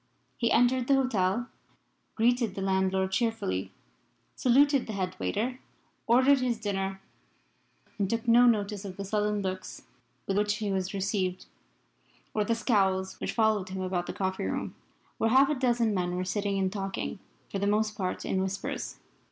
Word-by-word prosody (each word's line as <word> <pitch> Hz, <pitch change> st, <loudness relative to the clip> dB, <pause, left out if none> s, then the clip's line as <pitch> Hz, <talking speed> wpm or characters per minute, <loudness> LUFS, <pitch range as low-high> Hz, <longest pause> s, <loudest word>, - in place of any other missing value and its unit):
He 235 Hz, -2 st, 0 dB
entered 245 Hz, +1 st, +3 dB
the 275 Hz, -, +5 dB
hotel, 235 Hz, -3 st, +1 dB, 0.7 s
greeted 235 Hz, -3 st, +2 dB
the 195 Hz, -, -4 dB
landlord 190 Hz, 0 st, +1 dB
cheerfully, 205 Hz, -, -1 dB, 0.6 s
saluted 275 Hz, +2 st, +4 dB
the 220 Hz, -, -4 dB
head 185 Hz, -2 st, -2 dB
waiter, 250 Hz, +5 st, -2 dB, 0.5 s
ordered 260 Hz, +4 st, +5 dB
his 250 Hz, -2 st, 0 dB
dinner, 195 Hz, -2 st, -2 dB, 1.0 s
and 195 Hz, -2 st, +1 dB
took 230 Hz, 0 st, -2 dB
no 240 Hz, +2 st, +7 dB
notice 210 Hz, -3 st, +1 dB
of 190 Hz, -2 st, -7 dB
the 200 Hz, -, -4 dB
sullen 210 Hz, 0 st, 0 dB
looks 185 Hz, 0 st, -5 dB, 0.4 s
with 195 Hz, +1 st, 0 dB
which 210 Hz, 0 st, +1 dB
he 210 Hz, -2 st, -2 dB
was 190 Hz, 0 st, -2 dB
received 190 Hz, -2 st, -1 dB, 0.9 s
or 210 Hz, -, +1 dB
the 230 Hz, +3 st, 0 dB
scowls 195 Hz, -5 st, +1 dB
which -, -, -3 dB
followed 215 Hz, -4 st, +2 dB
him 190 Hz, 0 st, -4 dB
about 180 Hz, -1 st, -2 dB
the -, -, -4 dB
coffee 190 Hz, -1 st, -2 dB
room, -, -, -3 dB, 0.5 s
where 225 Hz, -, +2 dB
half 265 Hz, +4 st, +5 dB
a -, -, +2 dB
dozen 240 Hz, -5 st, +1 dB
men 180 Hz, -2 st, -1 dB
were 180 Hz, 0 st, -2 dB
sitting 200 Hz, +1 st, -1 dB
and 190 Hz, 0 st, 0 dB
talking, 195 Hz, -, -4 dB, 0.3 s
for 195 Hz, -, -2 dB
the 200 Hz, -, 0 dB
most 215 Hz, +1 st, +1 dB
part 185 Hz, -3 st, -3 dB
in 190 Hz, -, 0 dB
whispers. 190 Hz, +1 st, -4 dB
205 Hz, 165 wpm, -29 LUFS, 190-235 Hz, 1.0 s, no